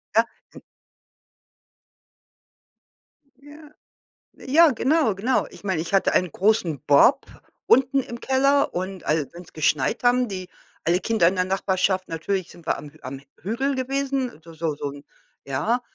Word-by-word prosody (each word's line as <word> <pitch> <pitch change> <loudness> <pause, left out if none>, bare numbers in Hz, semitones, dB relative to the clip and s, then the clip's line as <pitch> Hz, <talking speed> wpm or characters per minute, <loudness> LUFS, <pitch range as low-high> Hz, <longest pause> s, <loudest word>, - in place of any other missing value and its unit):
Ja, 225 - +6 0.3
n - - -12 2.8
Ja. 295 +1 -14 0.7
Ja, 310 +4 +4
genau, 260 -3 +2
genau. 230 +7 0
Ich - - -14
meine, 190 -5 -1
ich 165 - -5
hatte 195 - +3
einen 180 -4 +1
großen 185 - +1
Bob 240 - +5 0.4
unten 265 +2 +4
im 235 -2 -7
Keller 275 +2 +2
und 185 +1 -4
als 150 -2 -1
wenn's 175 0 -12
geschneit, 155 - 0
haben 245 0 +4
die 185 -2 -6 0.4
alle 175 +3 +2
Kinder 220 -7 +3
in 190 - -1
der 180 - +2
Nachbarschaft 190 0 0
natürlich 175 +3 -3
sind 170 -1 -15
wir - - +1
am 145 - -10
am 135 +1 -7 0.2
Hügel 260 +8 -1
gewesen, 265 - -2
so 165 - -13
so 160 -2 -2
so 145 - -5
'n 140 0 -12 0.4
ja, 215 - 0
195 Hz, 145 wpm, -23 LUFS, 165-260 Hz, 2.8 s, Ja